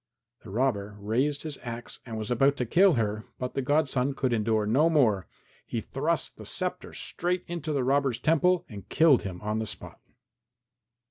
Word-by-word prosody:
The 110 - -12
robber 105 -3 -1
raised 130 +8 0
his 155 -3 -4
axe, 120 -1 -6
and 115 -2 -5
was 110 +2 -4
about 135 +4 +3
to 125 - -1
kill 185 - +5
her, 110 -3 -1
but 125 0 -4
the 135 - -1
godson 140 -1 +1
could 130 -2 0
endure 110 -1 +1
no 140 +10 +3
more; 115 - +3 0.4
he - - -3
thrust - - -2
the - - -10
sceptre - - -3
straight 180 +1 -2
into 170 -3 -4
the 140 -3 0
robber's 135 -2 +2
temple 165 +6 +2
and 100 -3 -10
killed 160 -5 +5
him 95 -3 -6
on 105 +1 -1
the 110 - -3
spot. - - -9
125 Hz, 180 wpm, -28 LUFS, 110-150 Hz, 0.4 s, kill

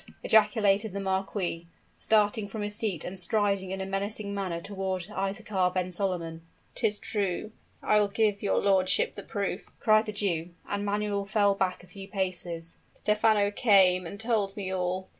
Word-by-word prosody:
ejaculated 210 -1 +3
the 200 - -3
marquis, 190 -3 -2 0.3
starting 210 -1 +2
from 210 +1 -5
his 205 0 -2
seat 205 -7 -2
and 185 +1 -5
striding 200 0 0
in 190 +1 -4
a 190 - -3
menacing 200 +1 -2
manner 190 -4 -2
toward 190 -1 -3
Isaachar 195 -1 -1
ben 185 0 -1
Solomon. 175 -3 -2 0.3
"'Tis 215 -3 0
true! 205 0 -2 0.3
I 210 - +4
will 205 - +3
give 205 0 +1
your 200 - +1
lordship 185 -2 +2
the - - -7
proof!" 200 -2 -4
cried 215 0 +4
the - - -2
Jew: 175 -5 -2
and 205 0 -2
Manuel 205 0 -1
fell 205 0 +3
back 185 -2 -1
a - - -16
few 195 +1 -10
paces. 175 -4 -3
"Stephano 210 -1 +2
came 190 -5 +4
and 200 +4 -8
told 215 -3 0
me 190 -2 -3
all. 185 0 -2
200 Hz, 165 wpm, -28 LUFS, 185-210 Hz, 0.3 s, I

